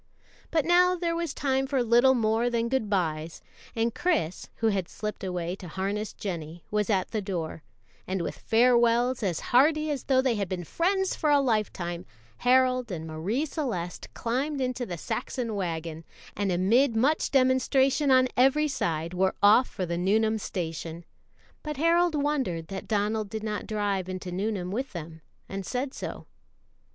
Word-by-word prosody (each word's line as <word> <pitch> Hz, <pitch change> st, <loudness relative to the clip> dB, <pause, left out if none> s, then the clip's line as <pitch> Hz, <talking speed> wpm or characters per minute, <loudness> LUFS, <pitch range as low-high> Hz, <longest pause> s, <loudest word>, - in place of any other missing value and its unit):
But 315 Hz, -3 st, +1 dB
now 360 Hz, +1 st, +5 dB
there 340 Hz, -1 st, -1 dB
was 335 Hz, -3 st, -2 dB
time 270 Hz, -2 st, 0 dB
for 265 Hz, -2 st, +1 dB
little 240 Hz, +3 st, +5 dB
more 225 Hz, +1 st, +1 dB
than 235 Hz, -1 st, 0 dB
good 255 Hz, -5 st, 0 dB
bys, 160 Hz, -5 st, -1 dB, 0.4 s
and 230 Hz, 0 st, 0 dB
Chris, 305 Hz, -, -1 dB
who 225 Hz, -, +1 dB
had 190 Hz, -4 st, -1 dB
slipped 210 Hz, -1 st, -5 dB
away 180 Hz, -1 st, -3 dB
to 185 Hz, -, -9 dB
harness 200 Hz, +5 st, -3 dB
Jennie, 170 Hz, -4 st, -6 dB
was 210 Hz, 0 st, 0 dB
at 190 Hz, -3 st, +1 dB
the 215 Hz, -, -1 dB
door; 175 Hz, -5 st, -4 dB, 0.5 s
and 185 Hz, -1 st, -1 dB
with -, -, -4 dB
farewells 240 Hz, +1 st, +3 dB
as 185 Hz, -6 st, -1 dB
hearty 305 Hz, +4 st, +4 dB
as 280 Hz, -, -4 dB
though 265 Hz, -1 st, +3 dB
they 260 Hz, -2 st, +2 dB
had 200 Hz, -4 st, -2 dB
been 180 Hz, -2 st, -3 dB
friends 380 Hz, -, 0 dB
for 305 Hz, -, 0 dB
a 290 Hz, -1 st, +5 dB
lifetime, 210 Hz, -9 st, -1 dB, 0.3 s
Harold 255 Hz, -2 st, +3 dB
and 160 Hz, -3 st, -4 dB
Marie 175 Hz, -, -2 dB
Celeste 235 Hz, -, -4 dB
climbed 270 Hz, +5 st, -1 dB
into 250 Hz, -2 st, -2 dB
the 175 Hz, -, -5 dB
Saxon 240 Hz, +5 st, -3 dB
wagon, 165 Hz, -4 st, -4 dB, 0.3 s
and 200 Hz, -2 st, 0 dB
amid 225 Hz, +8 st, +3 dB
much 280 Hz, +8 st, +2 dB
demonstration 265 Hz, +2 st, +3 dB
on 255 Hz, -1 st, +5 dB
every 270 Hz, +4 st, +4 dB
side 170 Hz, -, -2 dB
were 190 Hz, +1 st, +1 dB
off 215 Hz, +5 st, +6 dB
for 185 Hz, -, -4 dB
the 170 Hz, 0 st, -2 dB
Nuneham 220 Hz, +4 st, +2 dB
station; 165 Hz, -3 st, -5 dB, 0.6 s
but 300 Hz, -2 st, -5 dB
Harold 335 Hz, +2 st, +3 dB
wondered 270 Hz, -, -1 dB
that 195 Hz, -1 st, -6 dB
Donald 210 Hz, 0 st, 0 dB
did 220 Hz, +1 st, -5 dB
not 210 Hz, -1 st, -3 dB
drive 205 Hz, -4 st, -1 dB
into 185 Hz, -1 st, -5 dB
Nuneham 190 Hz, -1 st, -2 dB
with 260 Hz, +5 st, -3 dB
them, 160 Hz, -2 st, -8 dB, 0.3 s
and 195 Hz, 0 st, -5 dB
said 260 Hz, +6 st, -3 dB
so. -, -, -6 dB
220 Hz, 165 wpm, -27 LUFS, 185-265 Hz, 0.6 s, off